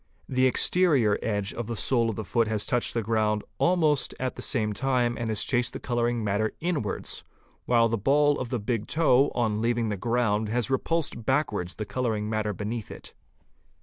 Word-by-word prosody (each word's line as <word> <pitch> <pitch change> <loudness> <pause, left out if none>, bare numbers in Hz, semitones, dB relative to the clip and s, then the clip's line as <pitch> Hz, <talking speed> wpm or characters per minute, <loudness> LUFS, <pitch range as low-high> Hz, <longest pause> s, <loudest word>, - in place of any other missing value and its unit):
The 130 0 +2
exterior 135 - +3
edge 100 -3 -2
of 120 -2 -5
the 115 - -3
sole 115 +1 +1
of 110 - -3
the 110 - -5
foot 115 +2 +1
has 110 -2 0
touched 120 -2 -1
the 115 - 0
ground 105 -1 0 0.2
almost 155 -6 +2
at 130 0 -2
the - - -7
same 110 -4 0
time 125 0 0
and 115 -1 -3
has 110 -1 0
chased 125 -2 0
the - - -5
colouring 120 -1 -1
matter 105 +1 0
inwards, 160 - -2 0.4
while 115 -1 +4
the 115 -1 -1
ball 145 +6 +3
of 125 - -4
the 125 - -1
big 110 0 -2
toe 145 -3 +3
on 110 -3 0
leaving 115 -1 0
the 105 - -2
ground 110 -1 0
has 120 +3 -1
repulsed 140 -2 -1
backwards 105 - 0
the 105 - -4
colouring 110 -3 -2
matter 110 -1 -1
beneath 105 +2 -5
it. - - -11
115 Hz, 190 wpm, -26 LUFS, 105-130 Hz, 0.4 s, while